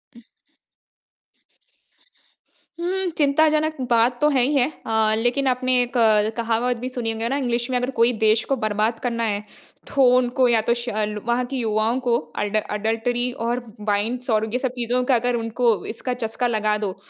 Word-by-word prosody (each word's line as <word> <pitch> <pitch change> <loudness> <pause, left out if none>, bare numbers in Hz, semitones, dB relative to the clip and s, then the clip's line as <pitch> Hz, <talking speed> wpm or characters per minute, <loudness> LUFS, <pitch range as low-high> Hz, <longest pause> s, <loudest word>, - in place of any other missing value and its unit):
उ - - -14 2.6
हुँ, 370 +1 -1
चिंताजनक 310 +1 +2
बात 240 +1 +2
तो 300 - +5
है 265 -4 +2
ही 275 +4 +1
है 260 -1 +3 0.2
अ, 220 -1 +2
लेकिन 245 +4 0
आपने 255 0 +1
एक 245 -1 -3 0.4
कहावत 235 +1 0
भी 250 +2 -5
सुनी 240 -3 -3
होगी 225 +1 -3
ना 275 - 0
इंग्लिश 240 -2 -1
में 255 - -1
अगर 250 +1 -1
कोई 235 +1 +5
देश 220 +1 +4
को - - +4
बर्बाद 215 0 -1
करना 235 -2 -2
है, 210 -1 -1 0.4
तो 275 -1 +2
उनको 250 0 +2
या 230 -2 +3
तो - - +5
शल 215 -3 -3
वहाँ 240 +1 0
के 270 +2 -6
युवाओं 225 +1 0
को 235 -1 +3 0.3
एडल 210 +1 0
एडल्टरी 230 +3 -1 0.2
और 240 +1 -1 0.3
वाइंस 235 +5 -1
और 220 0 +2
ये 250 - +1
सब 260 -2 -1
चीज़ 240 0 -3 0.2
का 255 - +5
अगर 245 +1 0
उनको 230 0 +1
इसका 250 +3 -4
चस्का 245 0 -2
लगा 215 -2 0
दो, 200 -3 -3
240 Hz, 175 wpm, -22 LUFS, 225-255 Hz, 2.6 s, तो